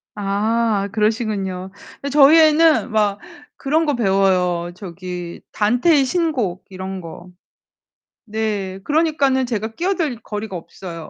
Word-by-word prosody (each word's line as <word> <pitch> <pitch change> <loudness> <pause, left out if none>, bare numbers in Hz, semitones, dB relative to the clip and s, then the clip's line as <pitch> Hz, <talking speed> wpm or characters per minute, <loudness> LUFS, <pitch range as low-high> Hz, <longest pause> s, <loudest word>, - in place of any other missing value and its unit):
아 205 +1 0
그러시군요. 210 -4 -1 0.3
근데 280 - -3
저희 295 +2 +7
애는 315 -3 +4
막 205 -2 +1 0.4
그런 315 +4 0
거 290 -3 0
배워요. 185 -5 +1
저기 180 -2 -7
단테의 250 +8 +3
신곡 260 - -1
이런 190 0 -6
거. 175 +1 -10 1.0
네. 205 -3 -3
그러니까는 290 -4 +1
제가 220 -1 -4
끼어들 330 - -1
거리가 210 -3 -5
없어요. 165 -1 -9
215 Hz, 250 characters per minute, -20 LUFS, 190-275 Hz, 1.0 s, 저희